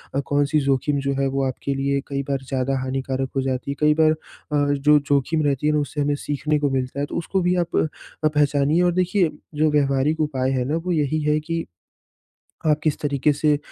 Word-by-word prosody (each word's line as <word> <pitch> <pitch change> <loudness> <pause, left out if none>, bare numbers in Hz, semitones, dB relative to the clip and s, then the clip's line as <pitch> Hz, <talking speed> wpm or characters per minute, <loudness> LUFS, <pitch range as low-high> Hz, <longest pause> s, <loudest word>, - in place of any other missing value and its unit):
अ, 140 - +2
कौन-सी 145 +2 +1
जोख़िम 135 0 +1
जो 140 0 -1
है 135 - +2
वो 135 0 -1
आपके 135 +1 -2
लिए 140 0 0
कई 140 -1 -2
बार 135 -1 -3
ज़्यादा 135 0 0
हानिकारक 130 0 -2
हो 135 - +2
जाती 130 +1 -2
है, - - -4
कई 150 0 +4
बार 155 0 +5
अ, 145 -2 -2
जो 150 +2 +4
जोख़िम 145 +2 0
रहती 145 0 0
है 150 - +3
ना, 150 - +2
उससे 145 +1 -3
हमें 145 0 +1
सीखने 145 +1 -1
को 145 -1 +1
मिलता 130 +1 -2
है, 145 - 0
तो - - -5
उसको 190 +3 -1
भी 180 +1 +2
आप - - -8
अ, 155 0 -2
पहचानिए 150 +2 +2
और 175 -1 +3
देखिए, 180 -1 +2 0.3
जो 155 0 +2
व्यावहारिक 145 +1 +1
उपाय 135 -4 0
है 130 -2 0
ना, 145 +4 -1
वो 175 +2 -3
यही 155 -1 0
है 150 +1 +2
कि 165 +2 -3 1.0
आप 150 -1 +3
किस 155 - +1
तरीक़े 145 0 +1
से 145 0 +2
145 Hz, 220 wpm, -22 LUFS, 135-155 Hz, 1.0 s, बार